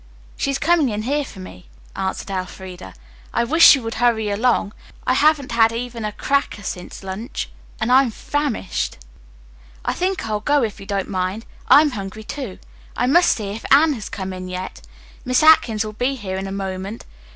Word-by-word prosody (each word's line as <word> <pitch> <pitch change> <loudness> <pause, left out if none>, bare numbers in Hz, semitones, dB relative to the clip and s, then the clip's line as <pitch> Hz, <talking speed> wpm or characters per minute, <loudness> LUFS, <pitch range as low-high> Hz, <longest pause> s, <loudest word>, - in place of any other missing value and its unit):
"She - - -1
is 275 - 0
coming 315 -2 +3
in 210 -1 -3
here 290 +5 0
for 215 - -11
me," 185 -1 -11 0.3
answered 190 +1 -3
Elfreda. 185 - -6 0.4
"I - - +3
wish 320 +8 +3
she 275 - +8
would 225 -2 -5
hurry 220 -3 +2
along. 210 -1 +1 0.3
I 255 - +3
haven't 290 -1 +3
had 225 -1 +4
even 235 0 -5
a 210 - -2
cracker 280 +6 0
to - - -12
eat - - -12
since 180 +2 -6
luncheon 195 +7 -5 0.3
and 220 +3 0
I'm 260 0 +6
famished." 275 -4 -2 0.9
"I - - +1
think 375 +1 -1
I'll 215 -1 -1
go 285 +4 +2
if 215 -3 -3
you 195 - -11
don't 200 -2 -1
mind. 190 +3 -2 0.2
I'm 295 0 +7
hungry, 205 -1 -6
too. 240 -5 -6 0.4
I - - +2
must 340 +7 +5
see 210 -3 -5
if 220 +3 -7
Anne 300 +3 +6
has 220 -7 -6
come 190 -2 -5
in 185 0 -6
yet. 185 +1 -6 0.4
Miss 255 +2 +2
Atkins 230 -9 +5
will 215 - -6
be 250 +5 -1
here 190 -6 -5
in 190 0 -4
a - - -5
moment. 195 +2 -5
220 Hz, 195 wpm, -21 LUFS, 195-270 Hz, 0.9 s, she